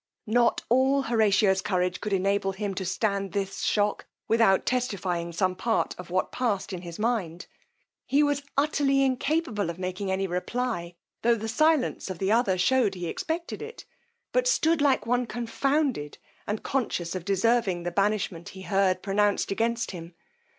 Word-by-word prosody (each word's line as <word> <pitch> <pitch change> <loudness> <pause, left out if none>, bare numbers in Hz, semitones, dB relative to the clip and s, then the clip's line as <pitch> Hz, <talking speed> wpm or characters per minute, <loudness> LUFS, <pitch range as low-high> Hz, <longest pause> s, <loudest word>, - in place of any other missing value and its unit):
Not 235 +1 +2
all 265 +3 +3
Horatio's 205 -5 +3
courage 180 -2 -1
could 210 - -3
enable 195 0 +1
him 200 0 -3
to 190 0 -4
stand 195 0 -1
this 195 -1 -3
shock, 205 0 0 0.2
without 225 -4 +3
testifying 185 -9 -1
some 185 +2 0
part 225 +3 0
of 180 - -8
what 185 +1 0
passed 210 -6 -1
in 180 - -5
his 170 -2 -8
mind: 210 -7 -1 0.6
he 285 +2 +3
was 290 -1 +1 0.2
utterly 280 -1 +2
incapable 260 - 0
of 170 - -5
making 185 +2 -3
any 190 +1 0
reply, 180 -1 -3 0.3
tho' 235 0 +4
the 220 0 -5
silence 305 0 +1
of 185 - -4
the 195 +3 0
other 225 -5 +3
shewed 215 +1 +2
he 180 -1 -5
expected 335 - -4
it, 460 +2 -9 0.5
but - - +2
stood 330 -10 +2
like 270 -7 +3
one 245 +1 +1
confounded, 245 - -1 0.3
and 210 +1 -3
conscious 195 -10 -1
of 185 -2 -4
deserving 200 -1 +1
the 175 - -2
banishment 195 -2 -1
he 190 -1 -10
heard 195 -2 +1
pronounced 205 0 +1
against 230 +3 0
him. 170 -2 -9
205 Hz, 160 wpm, -27 LUFS, 185-245 Hz, 0.6 s, tho